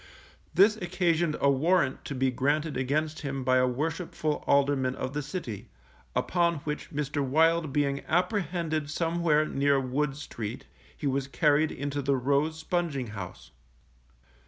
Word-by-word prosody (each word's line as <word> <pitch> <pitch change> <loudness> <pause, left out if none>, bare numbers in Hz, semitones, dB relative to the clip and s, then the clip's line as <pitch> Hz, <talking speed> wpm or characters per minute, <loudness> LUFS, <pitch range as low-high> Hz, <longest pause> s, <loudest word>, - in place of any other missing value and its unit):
This 210 +3 +6
occasioned 175 -4 +1
a 140 - +4
warrant 145 0 +2
to 140 - -4
be 130 0 +1
granted 145 +5 0
against 150 +5 -1
him 135 -2 -4
by 130 0 +3
a 130 0 +4
worshipful 155 +3 -2
alderman 140 -2 +2
of 130 - -4
the 150 - -1
City, 135 - -6 0.5
upon 170 -1 +2
which 150 0 -4
Mr. 145 -2 -2
Wild 160 +3 +3
being 140 -1 0
apprehended 170 -4 0
somewhere 165 -1 +1
near 140 -1 +2
Wood 135 +2 -1
Street, 115 -5 -6 0.3
he - - -6
was 135 -1 0
carried 150 +1 +2
into 145 +1 -3
the 140 0 +1
Rose 140 +5 +1
Sponging 160 -7 -2
house. 90 -9 -8
145 Hz, 140 wpm, -28 LUFS, 135-165 Hz, 0.5 s, This